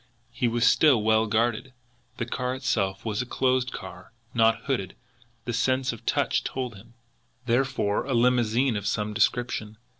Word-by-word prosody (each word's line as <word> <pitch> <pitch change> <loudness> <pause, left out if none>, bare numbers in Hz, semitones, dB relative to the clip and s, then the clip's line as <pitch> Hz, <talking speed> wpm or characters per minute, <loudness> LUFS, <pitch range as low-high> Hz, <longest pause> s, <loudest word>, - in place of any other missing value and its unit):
He 125 - -1
was 120 +1 +1
still 135 -9 +5
well 110 0 +3
guarded! 115 +4 0 0.4
The 115 - -2
car 125 +1 -3
itself 110 -8 -1
was 110 +1 -1
a - - -4
closed 130 0 +1
car 90 +2 -10 0.2
not 115 -1 +3
hooded, 120 -10 -2 0.5
the 120 - -3
sense 130 +2 +1
of 115 - -13
touch - - +1
told 130 -3 -4
him 115 +4 -16 0.5
therefore 120 -4 0
a 135 -2 -1
limousine 120 0 +2
of 105 -1 -3
some 105 -1 -1
description. 110 -1 0
120 Hz, 155 wpm, -26 LUFS, 110-125 Hz, 0.5 s, still